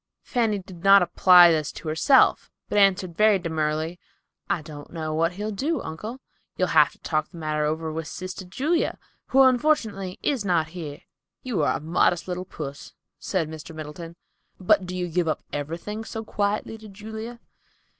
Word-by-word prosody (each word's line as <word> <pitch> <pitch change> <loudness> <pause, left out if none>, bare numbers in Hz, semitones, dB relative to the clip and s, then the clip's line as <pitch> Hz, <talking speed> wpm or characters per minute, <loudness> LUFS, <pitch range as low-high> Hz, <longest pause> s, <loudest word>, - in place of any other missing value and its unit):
Fanny 225 -4 0
did 185 -3 -11
not 195 -1 +7
apply 180 -1 +7
this 155 -2 0
to - - -9
herself, 160 - +4 0.2
but 205 - +2
answered 185 -3 +3
very 210 0 +5
demurely, 160 0 -2 0.5
"I 155 - 0
don't 150 -2 -10
know 155 -2 -4
what 165 +2 +1
he'll 210 +3 -4
do, 290 +11 -1
uncle. 210 +11 -6 0.4
You'll 185 - +1
have 155 0 +5
to - - -22
talk 155 -2 -1
the - - -13
matter 155 -1 -1
over 160 +1 -2
with 160 0 -4
sister 185 +2 -6
Julia, 280 - -1 0.3
who 270 +1 +5
unfortunately 235 -8 +1
is 270 -7 0
not 170 -5 +1
here." 155 -4 -7 0.4
"You 235 -10 -1
are 145 - +1
a - - -11
modest 170 +2 +1
little 180 0 -4
puss," 145 -6 -8 0.2
said 180 -5 -1
Mr. 160 +1 -9
Middleton. 160 +2 -8 0.4
"But 185 0 +3
do 180 - -5
you 180 -1 -2
give 175 0 0
up 155 - -1
everything 165 +9 -4
so 225 0 -6
quietly 210 +1 -2
to 215 -1 -12
Julia?" 220 +4 -8
180 Hz, 175 wpm, -25 LUFS, 160-210 Hz, 0.5 s, not